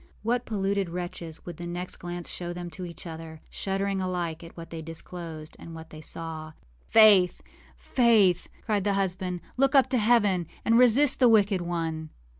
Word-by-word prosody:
What 240 +2 0
polluted 200 -3 -1
wretches 170 -2 -6
would 175 -3 -7
the 175 - -6
next 175 +1 -4
glance 175 -1 -6
show 175 -1 -4
them 175 0 -7
to 180 +3 -6
each 170 - -10
other, 160 -1 -8
shuddering 195 0 -2
alike 175 -3 -3
at 165 - -13
what 165 0 -9
they 165 -1 -6
disclosed 165 -1 -7
and 165 - -10
what 160 0 -11
they 155 - -10
saw! 160 -1 -6 0.4
âFaith! 205 -5 +7 0.4
Faith!â 215 -8 +2
cried 210 -3 0
the 200 0 +1
husband, 185 -2 -2 0.2
âlook 275 +1 +3
up 265 -1 +5
to 255 - +3
heaven, 210 -6 +3 0.2
and 230 +1 +5
resist 250 +3 +5
the 250 -2 +6
wicked 205 -4 +4
one. 165 -2 -3
180 Hz, 175 wpm, -27 LUFS, 165-205 Hz, 0.4 s, âFaith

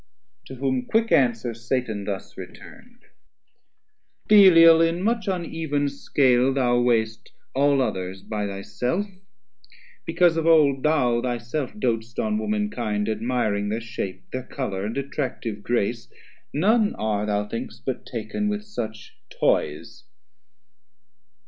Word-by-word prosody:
To 130 - -8
whom 130 -1 -1
quick 225 +1 +1
answer 120 -3 +2
Satan 115 -3 -3
thus 100 -2 -5
return'd 240 +1 -13 1.2
Belial 165 -6 +8
in 165 +2 +1
much 225 0 0
uneven 160 -6 -1
scale 135 -2 +2
thou 120 -2 +2
weigh'st 115 -2 0 0.2
All 140 0 +3
others 95 -3 -4
by 105 -2 -3
thy 100 0 -6
self; 125 - -2 1.0
because 165 0 +2
of 165 0 0
old 145 -5 +5
Thou 125 -6 +2
thy 120 -1 -1
self 125 +4 -4
doat'st 115 - -2
on 215 -1 0
womankind, 205 - -2
admiring 110 -2 -1
Thir 110 +2 -1
shape, 115 -5 -6
thir 130 - -3
colour, 105 -7 -4
and 115 - -5
attractive 130 -6 -4
grace, 115 0 -1 0.4
None 210 - +2
are, 105 -1 -1
thou 105 0 -1
think'st, 115 +4 -7
but 130 -2 -3
taken 120 - -3
with 210 0 -3
such 110 - -7
toys. 75 +2 -1
125 Hz, 125 wpm, -24 LUFS, 110-165 Hz, 1.2 s, Belial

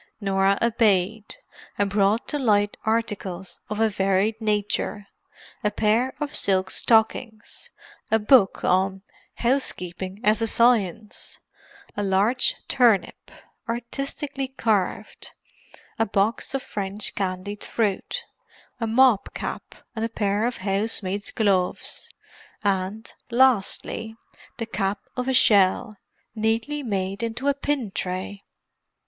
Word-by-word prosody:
Norah 195 -1 +2
obeyed, 215 - +1 0.4
and 205 - +2
brought 205 +2 +2
to 295 - -1
light 205 -5 +2
articles 205 -5 -2
of 210 0 -3
a 225 - +4
varied 200 +2 +1
nature; 210 -1 -1 0.6
a 210 - +3
pair 220 +5 +1
of 295 -1 -3
silk 190 -1 +2
stockings, 220 0 +1 0.4
a 220 - +4
book 210 -2 +4
on 190 +1 +1 0.3
Housekeeping 190 -7 -1
as 215 +1 +3
a 225 - +1
Science, 220 -3 +1 0.6
a 205 - -2
large 205 +6 +2
turnip, 235 -6 +2 0.4
artistically 270 +4 -3
carved, 220 -7 -2 0.7
a 225 - +2
box 205 +6 0
of 270 - -2
French 200 +1 -2
candied 195 +1 -4
fruit, 210 -4 -2 0.5
a 230 - -1
mob 235 -2 +4
cap - - -5 0.2
and 220 - -2
a 230 - -1
pair 205 0 0
of 245 - -3
housemaids' 200 0 -1
gloves, 195 -5 0 0.5
and, 200 +2 -1 0.2
lastly, 230 -2 +2 0.4
the 230 - -3
cap 200 -2 -2
of 250 0 -3
a 265 - +1
shell, 210 0 +4 0.4
neatly 225 +7 -1
made 195 -4 -2
into 230 +4 -3
a 285 - +4
pin 280 -6 -2
tray. 190 +2 -4
215 Hz, 115 wpm, -24 LUFS, 195-230 Hz, 0.7 s, a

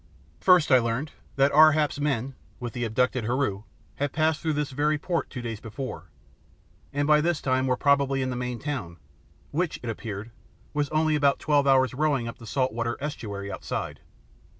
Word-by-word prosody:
First 180 -5 +5
I 130 - +8
learned 115 +6 -2 0.2
that 140 +1 +4
Ar 155 +1 +7
hap's 150 -1 0
men, 135 -3 -1 0.3
with 120 -2 -5
the 120 -1 -2
abducted 125 +1 0
Heru, 115 -4 -1 0.3
had 145 -1 -1
passed 155 0 +1
through 160 -2 0
this 150 -1 -2
very 150 +3 +1
port 170 +3 -2
two 125 - -7
days 115 -3 -4
before, 125 +4 -7 0.8
and 145 0 0
by 150 0 +5
this 170 0 +1
time 130 0 +1
were 125 -1 +1
probably 140 -2 +2
in 130 - -2
the - - -3
main 125 0 -3
town, 115 - -5 0.5
which, 170 +2 -1
it 120 - -2
appeared, 110 0 -6 0.4
was 145 -1 0
only 155 0 +2
about 140 -2 +3
twelve 145 -2 +2
hours' 130 -1 +4
rowing 140 -4 +1
up 115 - -7
the 115 - -11
salt 130 +2 0
water 115 +1 -2
estuary 100 -9 -5
outside. - - -4
135 Hz, 185 wpm, -26 LUFS, 120-150 Hz, 0.8 s, I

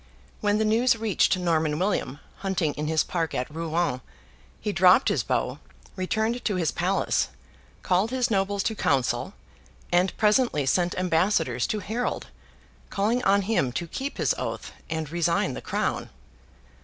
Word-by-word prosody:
When 205 0 +2
the 220 - +1
news 230 +3 +3
reached 215 -4 +2
Norman 160 -4 +1
William, 170 -7 -1 0.2
hunting 185 -6 -1
in 150 0 -4
his 160 0 +2
park 165 -3 -2
at 125 +4 -3
Rouen, 165 -4 -1 0.6
he 210 - -2
dropped 185 +5 +5
his - - +1
bow, - - -1 0.4
returned 220 +5 -1
to 205 - 0
his 170 -5 0
palace, 185 +3 +1 0.6
called 190 +3 +2
his 255 -1 0
nobles 195 0 +1
to 225 - 0
council, 135 -10 0 0.6
and 180 +2 +2
presently 210 - +3
sent 175 +6 +1
ambassadors 185 +2 +1
to 215 - -2
Harold, 225 +6 -3 0.6
calling 225 +5 0
on 200 +1 +4
him 190 - +1
to 170 - -2
keep 270 - -5
his - - +2
oath - - -4 0.2
and 160 -2 -3
resign 170 -5 +1
the - - -6
Crown. - - -2
185 Hz, 150 wpm, -26 LUFS, 165-215 Hz, 0.6 s, dropped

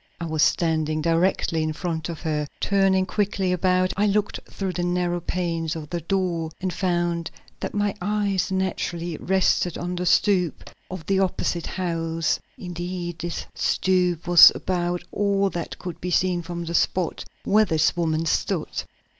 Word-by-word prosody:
I 170 - -3
was 155 -2 -1
standing 155 -2 +2
directly 165 0 +1
in 155 0 -1
front 160 -1 -3
of 165 -3 -6
her. 150 -3 -1
Turning 195 -1 +2
quickly 195 -1 0
about, 185 0 +2
I 205 +2 +2
looked 205 0 0
through 190 -2 -3
the 175 - -2
narrow 175 0 0
panes 165 -2 -2
of 155 -2 -7
the 175 -1 -2
door, 170 -2 -1
and 185 -1 -2
found 175 -3 -1 0.3
that - - -4
my 205 -1 +1
eyes 200 -2 0
naturally 175 -3 -2
rested 185 -2 +1
on 180 +1 -3
the 180 0 -2
stoop 180 -3 +2 0.2
of 185 -4 -7
the 195 +1 +1
opposite 180 -2 -1
house. 165 -2 -1 0.2
Indeed, 175 -1 -5
this 170 +1 -4
stoop 180 -2 +1
was 175 -1 +10
about 175 -1 -2
all 200 -1 +1
that 170 -1 -5
could 180 -2 -7
be 180 - -3
seen 180 0 +1
from 170 0 -5
the 170 - -4
spot 175 0 0 0.2
where 215 +1 +4
this 160 -3 +2
woman 165 -2 0
stood. 160 - -1
175 Hz, 160 wpm, -24 LUFS, 165-190 Hz, 0.3 s, was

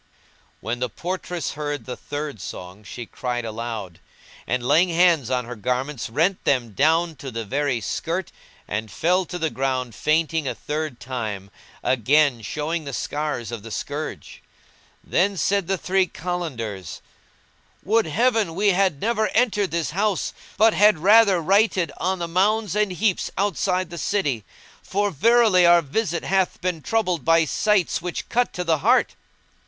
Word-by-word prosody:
When 120 +2 -3
the 125 0 -1
portress 175 - -4
heard 145 -1 -4
the 125 - -5
third 145 -7 -6
song 90 +4 -8
she 120 +3 -8
cried 120 +1 -4
aloud; 110 -6 -5 0.5
and, 125 -1 -1
laying 175 +6 +4
hands 165 -6 +3
on 125 -2 0
her 125 +1 -7
garments, 125 +4 -2
rent 165 +10 +1
them 125 -5 +1
down 160 - +2
to 135 +1 -7
the 115 -2 -5
very 140 +1 0
skirt 170 - -3 0.4
and 110 +2 -3
fell 180 - +1
to 180 - -6
the 160 -2 -1
ground 130 -1 -2
fainting 155 +1 0
a - - -2
third 150 -4 -4
time, 110 -6 -5 0.3
again 130 +1 +3
showing 155 +9 -3
the 140 -2 -6
scars 145 0 -3
of 115 -3 -5
the 115 - -10
scourge. 145 +7 -5 0.6
Then 195 +2 +1
said 195 +3 +1
the 195 - 0
three 190 +1 +1
Kalandars, 135 - -5 0.8
"Would 220 +1 +2
Heaven 220 0 +1
we 205 +2 +3
had 185 -6 +2
never 220 -1 +1
entered 210 -5 +2
this 165 -3 -2
house, 200 +2 0 0.2
but 220 +1 +5
had 210 -2 +5
rather 195 0 +5
nighted 195 0 +2
on 185 +2 -1
the 170 -1 -3
mounds 205 +3 +1
and 210 -2 +1
heaps 185 +1 0
outside 185 -2 0
the 170 - -6
city! 140 - -1 0.4
for 205 +1 -1
verily 220 - +4
our 170 0 +6
visit 170 +3 -2
hath 190 -1 0
been 180 -3 -2
troubled 185 - 0
by 165 0 +4
sights 195 0 +1
which 175 0 -5
cut 245 +1 +1
to 180 - -3
the 165 -3 +1
heart." - - +3
165 Hz, 160 wpm, -23 LUFS, 130-190 Hz, 0.8 s, our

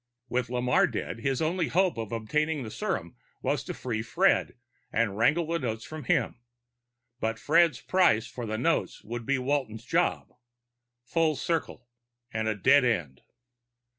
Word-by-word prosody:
With 125 -1 -1
Lamarre 125 0 +3
dead, 115 - -4
his 135 +5 0
only 165 +1 0
hope 185 +1 +2
of 115 -2 -5
obtaining 150 +6 -1
the 110 - -7
serum - - -3 0.3
was - - 0
to - - -4
free 115 -4 -3
Fred 110 - +2 0.3
and 110 -3 +1
wangle 155 +10 +3
the 165 +1 -1
notes 110 -5 -3
from 155 -3 -8
him. 120 - +1 0.8
But 115 -1 -1
Fred's 165 +3 +3
price 175 -12 +3
for 120 0 -6
the 110 0 -2
notes 145 +9 0
would 120 +1 -6
be 140 0 +2
Walton's 125 -4 -2
job. 170 +6 0 0.7
Full 160 +4 +1
circle, 145 -4 -3 0.5
and 110 0 -1
a 110 - +1
dead 130 +7 +5
end. 85 - -1
125 Hz, 155 wpm, -28 LUFS, 115-155 Hz, 0.8 s, dead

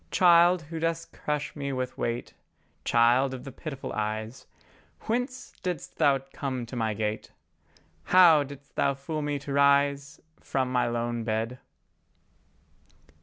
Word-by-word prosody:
Child, 175 -1 +5
who 160 +2 -6
dost 165 0 -2
crush 150 0 -3
me 140 -2 -3
with 130 -1 -3
weight, 120 +1 -3 0.5
Child 125 +3 +3
of 125 - -9
the 135 - -8
pitiful 135 0 -7
eyes, 110 +2 -4 0.5
Whence 250 +3 -3
didst 180 -5 -5
Thou 140 -1 +5 0.2
come 130 -4 -3
to 120 - -9
my 110 -3 -1
gate? 105 0 -3 0.8
How 175 -4 +7
didst 140 0 -9
Thou 140 - +1
fool 155 +3 -4
me 145 -1 -1
to 140 0 -6
rise 140 +1 +2 0.2
From 130 -2 -2
my 125 -1 +2
lone 120 0 -2
bed? 115 +3 -2
140 Hz, 135 wpm, -27 LUFS, 120-155 Hz, 0.8 s, How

